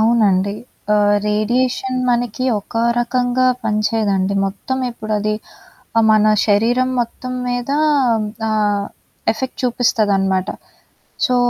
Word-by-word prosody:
అవునండి. 205 -4 +3 0.4
ఆహ్, 205 0 +3
రేడియేషన్ 250 +4 0
మనకి 240 0 -1 0.2
ఒక 215 - -10 0.2
రకంగా 245 +1 0 0.2
పని 215 0 0
చేయదండి. 200 -3 0
మొత్తం 210 +7 -4
ఇప్పుడది 215 -2 -2 0.6
ఆహ్, 225 - +5
మన 215 0 +4 0.2
శరీరం 235 +5 +2
మొత్తం 255 +2 -6
మీద 245 +1 -2 0.8
ఆహ్, 205 -2 +1 0.5
ఎఫెక్ట్ 260 +4 -5
చూపిస్తదనమాట. 200 -6 +1 0.8
సో, 250 - +1
220 Hz, 100 wpm, -18 LUFS, 205-245 Hz, 0.8 s, ఆహ్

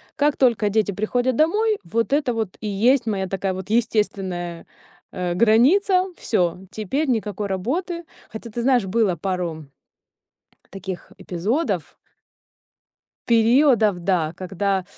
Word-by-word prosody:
Как 290 0 +2
только 230 -5 +3
дети 210 0 +1
приходят 245 +6 0
домой, 420 - +2
вот 230 +8 -1
это 285 -4 +1
вот 220 -4 -2
и 215 - -4
есть 235 +6 +2
моя 195 -3 -1
такая 195 0 -2
вот 190 +1 -7
естественная, 195 -6 -1 0.5
а, 180 -1 -3
граница. 305 - +4
Всё, 180 -6 0
теперь 265 +9 -2
никакой 210 -4 -1
работы. 330 - -2 0.3
Хотя, 225 +2 -8
ты 235 +2 -4
знаешь, 250 -4 +3
было 200 -1 +1
пару 170 -3 -3 1.1
таких 190 -1 -7
эпизодов. 210 - -2 1.3
Периодов, 230 -3 +4
да, 170 -5 +1
когда 190 +1 -1
215 Hz, 120 wpm, -22 LUFS, 190-250 Hz, 1.3 s, граница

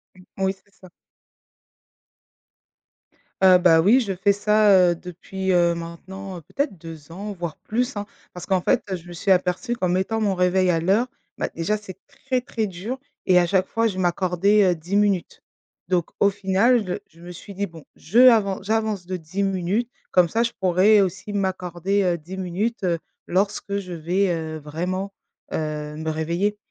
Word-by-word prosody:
Mmh 185 - -16
oui, 190 0 0
c'est 200 - -31
ça. 185 -1 -16 2.5
Heu, 185 -1 +8
bah, 165 -2 +5
oui 225 +9 +5
je 200 -6 -2
fais 190 +2 +2
ça, 210 +1 +3 0.2
heu, - - -1
depuis, 190 +2 -5
heu, 170 -1 +3
maintenant 180 +2 -8
peut-être 275 - -3
2 160 -1 -11
ans, 205 +4 -6
voire 170 -3 -5
plus, 245 +2 -2
hein. 205 - -3 0.3
Parce 180 - -8
qu'en 190 -2 +1
fait - - +2
je 175 0 -11
me 175 - -9
suis 190 +3 0
aperçue 185 +6 +1
qu'en 185 -6 -1
mettant 190 +5 0
mon 200 -2 +2
réveil 180 0 +2
à 165 -2 +2
l'heure, 200 +9 +2 0.3
bah, - - -2
déjà 170 +6 0
c'est 200 -3 -11
très, 255 -1 -3
très 220 -3 -2
dur 200 +9 -6 0.3
et 180 -1 +5
à 175 - +3
chaque 190 +1 +1
fois 230 0 +1
je 190 -3 -4
m'accordais, 185 +3 +2
heu, - - 0
10 175 +5 -4
minutes. 205 -3 +1 0.5
Donc 175 -3 +1
au 200 - +6
final 205 +4 +2 0.2
je 165 - -22
je - - -15
me 180 - -8
suis 195 +3 -10
dit: 200 +2 -2
«Bon 165 -2 -13
je 220 +9 0
avance 215 -7 +5
j'avance 215 -4 -1
de 185 0 -3
10 180 +5 -3
minutes, 195 +5 -1 0.2
comme 180 -2 +4
ça 230 +1 +1
je 235 - -1
pourrais 190 +3 +5
aussi 195 +2 -3
m'accorder, 190 0 -1
heu, 175 -2 +1
10 180 +5 -9
minutes, 190 +5 -2
heu, 170 -2 +1 0.3
lorsque 200 +2 0
je 180 -2 -7
vais, 180 +4 0
heu, 160 -1 -4
vraiment, 180 +6 -4 0.4
heu, 150 -1 -3
me 160 0 -3
réveiller, 170 +7 -1
190 Hz, 180 wpm, -23 LUFS, 175-205 Hz, 2.5 s, Heu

